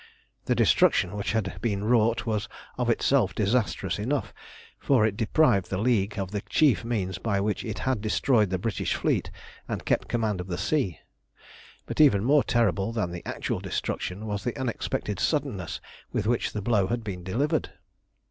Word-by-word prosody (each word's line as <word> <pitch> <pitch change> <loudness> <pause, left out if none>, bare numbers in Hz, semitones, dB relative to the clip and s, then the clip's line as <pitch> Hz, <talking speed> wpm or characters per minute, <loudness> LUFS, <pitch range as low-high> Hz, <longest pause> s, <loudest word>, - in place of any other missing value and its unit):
The - - +1
destruction 90 +3 +3
which 100 0 -2
had 95 -4 -2
been 100 -4 -1
wrought 115 0 +2
was 110 0 -1 0.3
of 125 -1 -1
itself 120 -1 +2
disastrous 105 0 0
enough, 130 +7 -2 0.5
for 125 -6 +3
it 110 -2 0
deprived 110 - +2
the 95 - -2
League 105 -2 +1
of 95 -1 -3
the 105 -1 -2
chief 145 -6 +3
means 105 -6 -2
by 100 -4 0
which 105 0 -1
it 110 -3 -4
had 130 -5 -1
destroyed 110 0 +2
the 95 - 0
British 105 +3 -1
fleet - - 0 0.4
and - - -4
kept - - +1
command 110 -5 -1
of 90 - -8
the 90 -2 -3
sea. 110 - -1 0.8
But - - 0
even 105 -10 +5
more 140 +4 +4
terrible 105 -3 +1
than 110 -7 -2
the 85 0 -6
actual - - -2
destruction 95 +4 -3
was 100 -2 -3
the 120 - -3
unexpected 115 -5 -2
suddenness 135 - -1 0.3
with - - -1
which 120 +1 0
the 105 - -3
blow 105 -4 +2
had 120 +2 -2
been 95 -4 -5
delivered. 140 - 0
110 Hz, 175 wpm, -27 LUFS, 100-120 Hz, 0.8 s, even